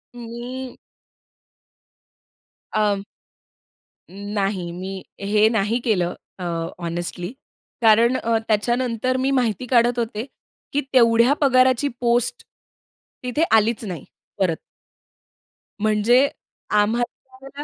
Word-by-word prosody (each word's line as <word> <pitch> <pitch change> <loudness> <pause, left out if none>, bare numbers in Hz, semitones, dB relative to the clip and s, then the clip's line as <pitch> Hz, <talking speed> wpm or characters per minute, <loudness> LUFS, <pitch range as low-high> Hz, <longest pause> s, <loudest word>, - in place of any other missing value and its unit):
मी. 245 +2 -7 2.0
अं 205 -2 +1 1.1
नाही, 195 -2 -3
मी 190 +2 -6 0.2
हे 210 +2 +3
नाही 225 +1 +1
केलं 180 -6 +1 0.3
अ, - - -5 0.4
हॉनेस्टली. 175 +1 -4 0.5
कारण 230 +2 +5
अ, 230 -2 +1
त्याच्यानंतर 240 +3 0
मी 265 +1 +1
माहिती 250 -3 0
काढत 240 0 +3
होते 225 -1 -3 0.5
की, 290 - +2
तेवढ्या 235 +1 +5
पगाराची 260 0 +4
पोस्ट, 240 - +1 0.8
तिथे 250 +6 0
आलीच 220 +1 +1
नाही 180 -7 -6 0.3
परत. 180 -4 +2 1.3
म्हणजे 215 +5 +4 0.5
आम्हाला 260 +5 -3
230 Hz, 90 wpm, -22 LUFS, 205-250 Hz, 2.0 s, कारण